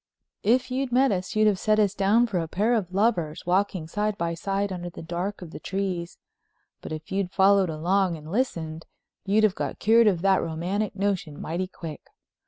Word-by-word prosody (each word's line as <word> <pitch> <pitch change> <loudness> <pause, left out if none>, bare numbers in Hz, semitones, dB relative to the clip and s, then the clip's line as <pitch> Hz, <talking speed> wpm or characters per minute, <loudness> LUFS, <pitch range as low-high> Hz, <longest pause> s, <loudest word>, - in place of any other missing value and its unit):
If 250 +4 +2
you'd 260 0 -1
met 260 +2 +4
us 185 0 -3
you'd 215 0 +4
have 205 -3 +3
set 215 -1 +2
us 205 -2 +3
down 205 +4 +3
for 200 -6 -1
a 165 - -2
pair 210 +8 +1
of 200 -6 -1
lovers, 185 -6 0
walking 185 -2 0
side 210 +4 -1
by 170 0 -1
side 195 +3 -2
under 175 -1 -5
the 165 - -10
dark 180 +4 -4
of 165 - -10
the - - -8
trees. 185 -3 -3 0.6
But - - -8
if 155 +2 -7
you'd 195 -1 0
followed 195 -1 +4
along 175 +3 +1
and 155 +1 -10
listened 165 -9 -2 0.4
you'd 205 +2 +3
have 215 -3 +4
got - - -4
cured 225 +1 +5
of 180 -4 +2
that 195 -1 +4
romantic 180 +6 -2
notion 190 -7 -2
mighty 175 +3 -3
quick. 165 -4 -8
195 Hz, 195 wpm, -26 LUFS, 170-210 Hz, 0.6 s, cured